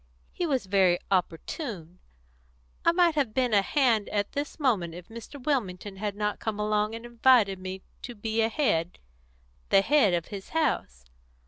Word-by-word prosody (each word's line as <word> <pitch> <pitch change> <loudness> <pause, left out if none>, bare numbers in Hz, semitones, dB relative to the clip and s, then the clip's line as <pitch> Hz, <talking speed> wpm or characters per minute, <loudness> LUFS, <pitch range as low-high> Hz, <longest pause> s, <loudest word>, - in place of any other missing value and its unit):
He 350 - -2
was 265 -8 0
very 190 -2 +3
opportune. 180 - -3 0.8
I 335 - +5
might 345 -1 +3
have 275 -8 -1
been 250 -3 +1
a 200 - +6
hand 230 -3 +2
at 205 -1 -1
this 290 +3 -4
moment 200 - +1
if 175 0 -11
Mr. 230 +5 -10
Wilmington 205 -8 -2
had 205 0 -3
not 210 0 -2
come 215 -2 -3
along 210 +1 0
and 230 +1 -8
invited 235 -5 +3
me 185 0 -6 0.2
to 245 - -7
be 220 +1 -1
a 225 - +2
head 180 - 0 0.7
the 195 - +5
head 240 -8 +4
of 170 -1 -3
his 195 -2 -8
house. 240 - -1
215 Hz, 165 wpm, -27 LUFS, 190-260 Hz, 0.8 s, a